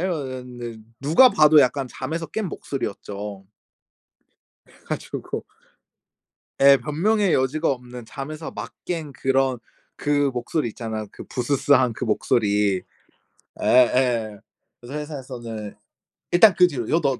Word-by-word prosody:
이랬는데 125 Hz, -9 st, -4 dB, 0.2 s
누가 160 Hz, -, +6 dB
봐도 155 Hz, -6 st, +6 dB
약간 130 Hz, +1 st, +1 dB
잠에서 165 Hz, +6 st, -4 dB
깬 210 Hz, +7 st, -3 dB
목소리였죠. 100 Hz, -8 st, -6 dB, 1.2 s
그래가지고 -, -, -6 dB, 1.4 s
예. 140 Hz, 0 st, +8 dB
변명의 190 Hz, +7 st, +1 dB
여지가 130 Hz, +4 st, +1 dB
없는 125 Hz, -2 st, -7 dB
잠에서 150 Hz, +6 st, -7 dB
막 -, -, -7 dB
깬 160 Hz, -5 st, -4 dB
그런 135 Hz, -1 st, +1 dB, 0.4 s
그 145 Hz, -1 st, +1 dB
목소리 125 Hz, +2 st, -2 dB
있잖아요, 110 Hz, -1 st, -5 dB
그 -, -, -10 dB
부스스한 130 Hz, -1 st, +2 dB
그 -, -, -5 dB
목소리. 105 Hz, -3 st, +1 dB, 0.8 s
예예. 120 Hz, -4 st, +3 dB, 0.4 s
그래서 135 Hz, +5 st, -6 dB
회사에서는 125 Hz, -8 st, -7 dB, 0.6 s
일단 185 Hz, +1 st, +7 dB
그 180 Hz, 0 st, +7 dB
뒤로 120 Hz, -7 st, -4 dB
"여 165 Hz, -, +3 dB
너, 140 Hz, -4 st, +2 dB
130 Hz, 260 characters per minute, -23 LUFS, 120-150 Hz, 1.4 s, 예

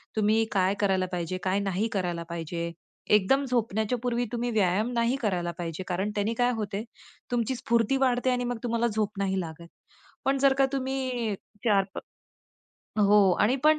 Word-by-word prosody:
तुम्ही 215 Hz, +1 st, +3 dB
काय 190 Hz, 0 st, +2 dB
करायला 190 Hz, -2 st, +2 dB
पाहिजे, 180 Hz, +1 st, -2 dB
काय 190 Hz, +1 st, +1 dB
नाही 200 Hz, +2 st, 0 dB
करायला 175 Hz, -3 st, -1 dB
पाहिजे. 170 Hz, 0 st, -4 dB, 0.4 s
एकदम 210 Hz, +7 st, +4 dB
झोपण्याच्या 225 Hz, -1 st, 0 dB
पूर्वी 245 Hz, 0 st, 0 dB
तुम्ही 240 Hz, 0 st, -1 dB
व्यायाम 210 Hz, +2 st, +2 dB
नाही 235 Hz, +2 st, +2 dB
करायला 180 Hz, -6 st, 0 dB
पाहिजे, 170 Hz, +1 st, -4 dB
कारण 190 Hz, +3 st, -1 dB
त्यांनी 210 Hz, +2 st, 0 dB
काय 245 Hz, +1 st, +2 dB
होतंय 210 Hz, -1 st, -3 dB, 0.5 s
तुमची 240 Hz, +1 st, 0 dB
स्फूर्ती 235 Hz, +2 st, +1 dB
वाढते 255 Hz, -1 st, +2 dB
आणि 245 Hz, 0 st, 0 dB
मग 245 Hz, -1 st, -2 dB
तुम्हाला 235 Hz, 0 st, +1 dB
झोप 215 Hz, -2 st, -2 dB
नाही 190 Hz, -1 st, 0 dB
लागत. 170 Hz, 0 st, -8 dB, 0.6 s
पण 275 Hz, 0 st, +2 dB
जर 275 Hz, 0 st, +5 dB
का 270 Hz, -, +6 dB
तुम्ही 260 Hz, -4 st, -1 dB, 0.3 s
4 200 Hz, -4 st, +4 dB
प -, -, -2 dB, 1.0 s
हो. 205 Hz, -2 st, +6 dB
आणि 220 Hz, +5 st, +4 dB
पण 310 Hz, 0 st, +6 dB
215 Hz, 165 wpm, -27 LUFS, 190-245 Hz, 1.0 s, का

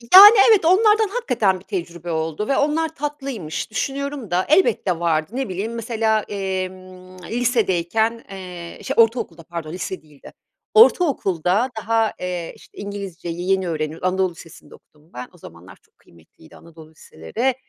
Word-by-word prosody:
Yani 415 Hz, +4 st, +12 dB
evet 415 Hz, -7 st, +5 dB
onlardan 425 Hz, +4 st, +4 dB
hakikaten 235 Hz, -, 0 dB
bir -, -, -18 dB
tecrübe 175 Hz, -2 st, -5 dB
oldu 160 Hz, +5 st, -2 dB
ve 275 Hz, -, +1 dB
onlar 315 Hz, +2 st, 0 dB
tatlıymış 275 Hz, -, -5 dB
düşünüyorum 275 Hz, -2 st, -4 dB
da 180 Hz, +1 st, +1 dB
elbette 305 Hz, -, +2 dB
vardı. 165 Hz, +1 st, 0 dB
Ne 265 Hz, -3 st, -2 dB
bileyim 200 Hz, +5 st, -4 dB
mesela, 225 Hz, -1 st, 0 dB
emm, 185 Hz, -2 st, -6 dB
lisedeyken, 225 Hz, -1 st, 0 dB
eee, 180 Hz, -3 st, -9 dB
şe -, -, -2 dB
ortaokulda 225 Hz, -8 st, +1 dB
pardon 165 Hz, -1 st, -7 dB
lise 185 Hz, +1 st, -5 dB
değildi. 150 Hz, -3 st, -16 dB, 0.4 s
Ortaokulda 240 Hz, -, +3 dB
daha, 225 Hz, 0 st, 0 dB
eee, 180 Hz, -2 st, -4 dB
işte -, -, -20 dB
İngilizceyi 190 Hz, -3 st, -5 dB
yeni 190 Hz, -1 st, +1 dB
öğreniyoruz, 155 Hz, +2 st, -3 dB
anadolu 185 Hz, 0 st, 0 dB
lisesinde 165 Hz, -1 st, -14 dB
okudum 150 Hz, +2 st, -26 dB
ben, 125 Hz, 0 st, -7 dB
o 180 Hz, -, -18 dB
zamanlar 90 Hz, -, -14 dB
çok -, -, -36 dB
kıymetliydi 80 Hz, -1 st, -21 dB
anadolu 160 Hz, -1 st, -15 dB
liseleri, 190 Hz, -, -3 dB
190 Hz, 145 wpm, -21 LUFS, 170-240 Hz, 0.4 s, Yani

